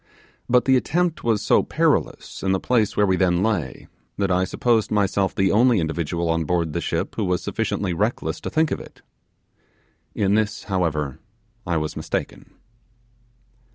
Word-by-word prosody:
But 125 0 +4
the 130 -1 +5
attempt 170 +5 0
was 115 -3 +1
so - - +4
perilous - - -1
in 95 0 +1
the 95 - +1
place 110 -3 +1
where 105 - +4
we 95 -2 +2
then 90 -1 +2
lay, 90 - -2 0.3
that 100 -2 0
I 90 +1 +2
supposed 115 +2 +1
myself 100 -2 +1
the 95 0 +2
only 115 +1 +4
individual 85 +1 -2
on 80 0 +1
board 85 -1 -1
the - - -2
ship - - -3
who 110 - 0
was 90 -2 0
sufficiently 95 -3 -2
reckless 105 +8 -2
to - - -4
think 160 0 +1
of - - -1
it. - - -15 1.1
In 100 -1 +1
this, 110 0 0
however, 80 -8 -1 0.5
I 85 -1 +1
was 75 0 -3
mistaken. - - -4
95 Hz, 165 wpm, -23 LUFS, 85-110 Hz, 1.1 s, the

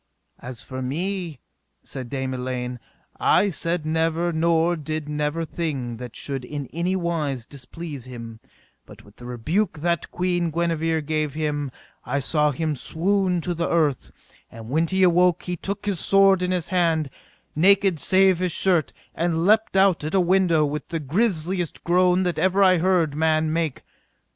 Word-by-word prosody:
As 125 -1 -8
for 130 0 -6
me, 170 +2 -3 0.4
said 130 -3 -7
Dame 130 -1 -3
Elaine, 125 -1 -4 0.4
I 200 - +3
said 165 -1 -2
never 165 +2 0
nor 165 +1 +2
did 155 -1 -4
never 150 +2 -2
thing 140 -9 -4
that 125 -1 -9
should 135 -2 -4
in 145 +2 -5
any 175 +3 0
wise 155 -9 -2
displease 140 0 -9
him, 115 -3 -9 0.5
but - - -14
with 105 0 -19
the 120 - -10
rebuke 155 - -1
that 170 0 -1
Queen 175 -1 -1
Guenever 165 -1 0
gave 155 -1 -2
him 150 -2 -2 0.3
I 130 +3 -2
saw 150 +2 +2
him 155 +2 -1
swoon 180 +5 0
to 175 - -2
the 170 0 -2
earth; 155 -6 +1 0.4
and 115 0 -11
when 160 +5 +1
he 190 +2 +1
awoke 180 -1 +4
he 180 - -3
took 200 +4 -5
his 200 -4 0
sword 195 0 +5
in 180 - 0
his 180 -3 -2
hand, 165 -6 +1 0.4
naked 190 +1 +4
save 190 0 +3
his 180 -1 0
shirt, 175 -2 +1 0.2
and 165 0 0
leapt 215 -1 +3
out 190 -5 +4
at 155 +5 -2
a - - +5
window 180 -3 +3
with 150 +1 -4
the 165 - -3
grisliest 175 - -1
groan 180 +1 +3
that 180 -3 -1
ever 190 +3 +3
I 185 -2 +5
heard 175 -4 +2
man 155 0 +1
make. 160 -5 -2
165 Hz, 165 wpm, -23 LUFS, 145-180 Hz, 0.5 s, sword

